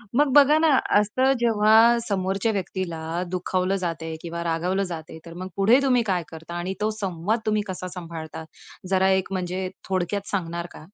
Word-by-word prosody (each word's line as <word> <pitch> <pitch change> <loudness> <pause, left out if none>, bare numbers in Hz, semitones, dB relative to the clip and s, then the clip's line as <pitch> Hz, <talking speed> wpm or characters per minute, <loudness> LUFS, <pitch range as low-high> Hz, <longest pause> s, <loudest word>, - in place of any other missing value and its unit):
मग 295 +2 +4
बघा 290 +1 +7
ना, 325 - +4 0.3
असं 255 +6 +2
जेव्हा 220 -2 +4 0.3
समोरच्या 195 +2 0
व्यक्तीला 185 -4 -4 0.3
दुखावलं 185 +1 0
जाते 165 -3 -3
किंवा 170 0 -5
रागवलं 175 +4 0
जातंय, 160 -3 -7
तर 165 - -10
मग 185 +2 -6
पुढे 225 +7 +5
तुम्ही 250 -3 +3
काय 185 -5 0
करता 165 +1 -10
आणि 175 +2 -3
तो 215 - +2
संवाद 195 +3 -1
तुम्ही 215 -1 +1
कसा 185 -1 -5
सांभाळता, 165 -3 -7 0.5
जरा 190 0 +3
एक 190 0 +1
म्हणजे 185 0 -2 0.2
थोडक्यात 190 +2 -1
सांगणार 170 -3 -2
का? 155 - -12
185 Hz, 165 wpm, -24 LUFS, 170-205 Hz, 0.5 s, बघा